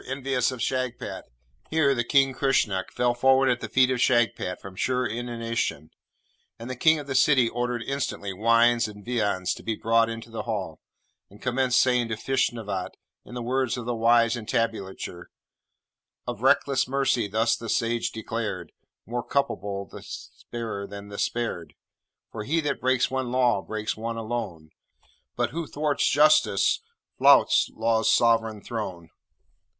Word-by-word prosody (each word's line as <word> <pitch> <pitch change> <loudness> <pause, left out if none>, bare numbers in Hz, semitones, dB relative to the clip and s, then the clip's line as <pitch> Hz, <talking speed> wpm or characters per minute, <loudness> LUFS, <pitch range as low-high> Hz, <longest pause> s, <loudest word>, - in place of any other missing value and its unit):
envious 130 -1 0
of 130 - -7
Shagpat!' 130 -2 -3 0.4
Here 155 -3 +3
the 120 -2 0
King, 135 +2 +3
Kresnuk, 120 -8 +1
fell 125 0 +1
forward 130 +2 +4
at 125 -1 +1
the - - -6
feet 130 0 +4
of 125 -2 -1
Shagpat 120 -7 +1
from 95 -1 -11
sheer 125 +5 0
inanition, 115 - -3 0.7
and 115 - -8
the - - -4
King 155 +5 +4
of 145 - -6
the 140 - -4
City 130 -2 +4
ordered 120 0 -2
instantly 135 -8 -3
wines 115 +3 +3
and 105 -1 -12
viands 100 -7 0
to - - -10
be 110 - -2
brought 115 +1 +2
into 115 0 -7
the 115 - -4
Hall, 100 -8 -4 0.5
and 100 - -16
commenced 125 0 +1
saying 125 -2 +3
to 110 - -2
Feshnavat, 110 -6 -2 0.3
in 125 - -11
the 120 - -4
words 130 +1 0
of 120 - -6
the 120 - -1
wise 115 0 +3
entablature: 105 -6 -3 1.0
'"Of - - -5
reckless 135 -3 +3
mercy 130 -4 +1
thus 110 +3 +1
the 115 - -8
Sage 115 +1 0
declared: 110 -6 -4 0.3
More 120 +2 -3
culpable 100 -9 -2
the - - -11
sparer 110 -4 -7
than 100 0 -9
the 100 - -7
spared; 85 -10 -3 0.6
For 105 - -5
he 155 +9 0
that 145 -2 -2
breaks 130 0 +2
one 130 -2 -2
law, 125 -5 +2
breaks 110 +1 -4
one 115 +1 -4
alone: 110 -9 -5 0.6
But - - -1
who 165 -1 -4
thwarts 150 -1 0
Justice 155 - +4 0.4
flouts - - +5
Law's 110 0 +2
sovereign 115 -3 +2
throne." 95 -8 -6
115 Hz, 155 wpm, -26 LUFS, 110-130 Hz, 1.0 s, flouts